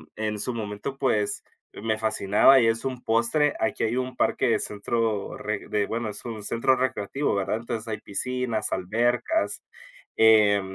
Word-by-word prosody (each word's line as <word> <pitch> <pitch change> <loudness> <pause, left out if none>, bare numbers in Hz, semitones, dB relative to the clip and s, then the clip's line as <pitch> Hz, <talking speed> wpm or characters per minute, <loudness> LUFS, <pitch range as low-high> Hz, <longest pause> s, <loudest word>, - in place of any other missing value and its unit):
en 105 -1 -3
su 125 - -2
momento, 110 +4 -5
pues 110 -7 0 0.3
me 110 0 -2
fascinaba, 110 +4 +4
y 115 - +3
es 115 0 0
un 130 -2 -4
postre, 120 +7 +2
aquí 110 - -1
hay 115 +2 0
un 130 0 -3
parque - - +1
de - - +2
centro, 110 0 -2
re 105 -1 -4
de, 105 -1 0
bueno, 115 0 -3
es 105 - -6
un 115 -3 -5
centro 115 +5 +2
recreativo, 130 0 -1
¿verdad? 100 +2 -1
Entonces, 115 -1 -5
hay 105 -1 -3
piscinas, 120 +2 -2
albercas, 120 - 0 0.6
eh, 105 -2 +6
110 Hz, 160 wpm, -25 LUFS, 105-125 Hz, 0.6 s, eh